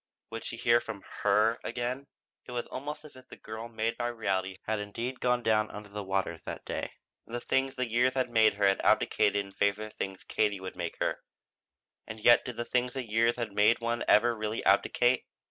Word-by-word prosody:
Would 115 0 -6
she 115 - -5
hear 120 0 +4
from 110 -4 -7 0.2
her 105 +3 +3
again? 125 +3 -3 0.4
It 125 - -7
was 120 -1 -2
almost 150 +3 -6
as 150 - -13
if 130 - -15
the - - -12
girl 110 +2 -7
made 115 0 -2
by 120 - -1
reality 95 -5 -1
had 110 -1 -1
indeed 115 +5 -4
gone 125 -1 +1
down 110 -1 +2
under 105 0 -9
the 105 0 -5
waters 95 -4 -2
that - - -7
day, - - -4 0.3
and 115 - -6
the - - -1
things 135 +2 0
the 130 -1 -1
years 120 +3 +2
had 130 -1 +1
made 110 -2 +4
her 100 0 +1
had 95 0 +3
abdicated 100 - +3
in 100 - -13
favor 100 +2 0
of 110 - -7
the - - -29
things 95 -1 -5
Katie 105 -2 0
would 95 0 -7
make - - -4
her. - - 0 0.9
And 110 0 -7
yet 120 +2 +6
did 125 -3 -6
the 120 - -2
things 125 0 0
the 130 - -3
years 115 +2 +2
had 115 -3 -3
made 105 +3 +4
one 115 0 -1
ever 120 +2 +5
really 110 0 -3
abdicate? 120 +5 +3
115 Hz, 220 wpm, -30 LUFS, 105-120 Hz, 0.9 s, yet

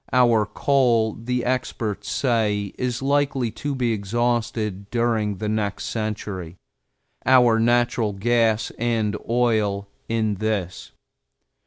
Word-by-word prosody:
Our 120 -4 +4
coal, 120 -4 +2
the 125 +2 -3
experts 120 -4 -2
say, 105 -6 0
is 125 0 -2
likely 140 -4 +1
to 140 +6 -4
be 120 -3 0
exhausted 110 -1 -1
during 115 -4 0
the 105 - -3
next 105 -2 -2
century, 105 -6 -4 0.7
our 125 -3 +5
natural 120 -2 +2
gas 110 +1 +1
and 110 -3 0
oil 110 -4 +1 0.2
in 110 -3 0
this. 105 -5 -2
115 Hz, 110 wpm, -23 LUFS, 105-120 Hz, 0.7 s, our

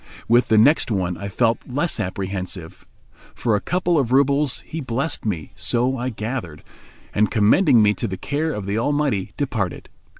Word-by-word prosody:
With 120 +2 +4
the 110 - +3
next 140 +8 +5
one 90 -5 -1
I 100 - -6
felt 115 +3 +1
less 145 +3 -1
apprehensive. 95 -3 -5 0.5
For 115 -3 +1
a 105 - -1
couple 175 -2 +1
of 125 -4 -1
roubles 140 +1 +2
he 160 - -6
blessed 130 +3 -2
me, 85 -8 -3
so 125 +2 0
I 125 0 -2
gathered; 110 - -5 0.5
and, 105 0 +2
commending 115 - +4
me 105 0 +4
to - - -3
the 95 - -5
care 150 - -2
of 105 -8 -5
the 100 +3 -1
Almighty, 145 -7 0
departed. 115 - -3
115 Hz, 170 wpm, -22 LUFS, 100-140 Hz, 0.5 s, next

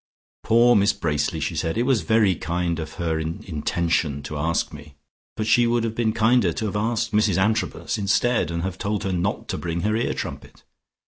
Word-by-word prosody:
"Poor 120 +2 +5
Miss 100 0 +4
Bracely!" 80 -7 -1
she - - -2
said. 80 +5 -1
"It 120 - +2
was 130 -4 +2
very 110 -4 +3
kind 85 0 -2
of 80 -1 -6
her 80 -2 -2
in 80 +1 -4
intention 80 -3 -1
to 75 - -6
ask 80 +3 -1
me, 75 -1 -12 0.4
but 110 - -1
she 120 +2 +4
would 120 0 +1
have 115 -1 -2
been 115 -1 0
kinder 115 -3 +3
to 110 - -3
have 105 - -3
asked 115 +2 0
Mrs 105 -3 +2
Antrobus 110 +2 0
instead, 105 -1 +1
and 85 0 -3
have 95 0 -4
told 105 0 -2
her 95 - -1
not 90 +2 -2
to - - -2
bring 85 0 -3
her 110 +3 0
ear 115 - -1
trumpet. - - -7
100 Hz, 205 wpm, -23 LUFS, 85-110 Hz, 0.4 s, Poor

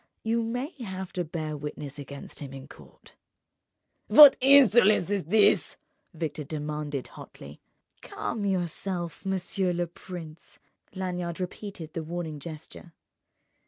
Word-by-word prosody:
You 230 +1 +1
may 245 +6 -3
have 190 -4 -6
to 180 - -1
bear 155 -2 -4
witness 145 -1 -7
against 140 0 -9
him 140 -2 -8
in 135 0 -9
court." - - -17 0.9
"What 295 -2 +10
insolence 240 -8 +6
is 200 -6 -1
this?" 210 +6 +3 0.3
Victor 160 -3 -4
demanded, 150 -2 -4
hotly. 70 +1 -12 0.4
"Calm 220 - -4
yourself, 180 -2 -2
monsieur 190 0 -1
le 175 0 0
prince." 170 -2 -10 0.4
Lanyard 180 -2 -3
repeated 180 -3 -6
the 165 - -3
warning 160 -2 -5
gesture. 160 +2 -10
175 Hz, 120 wpm, -27 LUFS, 150-195 Hz, 0.9 s, What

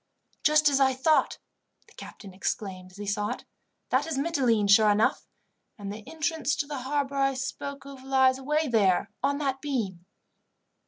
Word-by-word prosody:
"Just 305 0 +4
as 280 -1 +3
I 265 -1 +3
thought," 305 +4 +2 0.5
the - - -21
captain 195 -3 -11
exclaimed 185 -1 -4
as 185 - -17
he 205 - -6
saw 205 +1 -1
it. - - -6 0.5
"That - - +2
is 320 -4 -3
Mitylene, 260 -9 +1
sure 210 +1 +6
enough, 210 +2 +1 0.5
and 200 -1 -6
the 215 +1 -9
entrance 320 -2 -1
to - - -2
the 285 -2 -5
harbour 280 +1 -2
I 275 0 +2
spoke 275 +1 -5
of 275 -2 -11
lies 265 -1 +3
away 300 +3 0
there 200 -4 +2
on 280 +1 +1
that 270 -2 -2
beam." 200 - -3
265 Hz, 170 wpm, -27 LUFS, 210-285 Hz, 0.5 s, sure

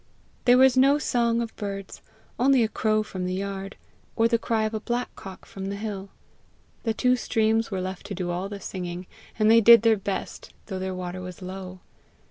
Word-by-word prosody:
There 245 0 +6
was 260 0 +6
no 275 +3 +5
song 235 -5 +1
of 230 - -8
birds 195 -2 -6 0.4
only 260 -1 +4
a - - +2
crow 215 0 +1
from 185 -3 -5
the 185 - -2
yard, 195 0 -5 0.4
or 225 - +4
the 230 0 +1
cry 225 -1 0
of 215 +1 -2
a 220 - -1
blackcock 225 -4 -5
from 195 0 -7
the 200 - -3
hill; 200 -2 -5 0.7
the 225 - -1
two 250 +1 +3
streams 225 -2 +1
were 190 -3 -3
left 185 +1 -6
to 200 - -5
do 175 -1 -3
all 180 +3 -3
the 200 -1 -6
singing, 180 -2 -6 0.3
and 215 0 +4
they 230 0 +7
did 230 0 +8
their 225 -1 +4
best, 195 0 -5
though 190 -3 -5
their 185 0 -3
water 185 0 -5
was 180 +1 -8
low. 185 0 -7
205 Hz, 200 wpm, -25 LUFS, 190-230 Hz, 0.7 s, did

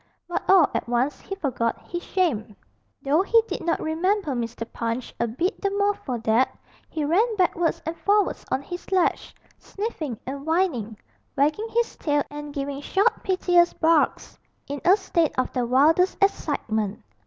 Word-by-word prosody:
But 350 - -2
all 370 -6 +7
at - - -2
once 245 +4 0
he 390 - -6
forgot 250 -10 -1
his 345 -1 -4
shame, 255 - -1 0.5
though 290 +5 +3
he 455 +4 +4
did - - -4
not 335 0 0
remember 335 +2 0
Mr. 230 -2 -3
Punch 230 +1 -3
a 235 - +1
bit 335 - -2
the 395 - +1
more 405 +1 +1
for 255 -10 -5
that; 225 +4 +2 0.3
he 310 -2 -2
ran 425 +9 +2
backwards 350 -3 +1
and 325 +1 -3
forwards 410 0 +1
on 265 - -1
his 355 +6 -8
ledge, 370 -3 +1 0.2
sniffing 325 - -5
and 275 +2 -5
whining, 300 - 0 0.4
wagging 300 +10 +1
his 470 +1 0
tail 290 -2 +1
and 295 0 -7
giving 280 0 -4
short 385 +7 +1
piteous 355 -2 +3
barks 320 -1 +1 0.3
in 285 0 -5
a 370 +3 +6
state 340 -5 0
of 255 - 0
the 245 -2 0
wildest 310 +9 +4
excitement. 220 - -1
315 Hz, 165 wpm, -24 LUFS, 255-375 Hz, 0.5 s, all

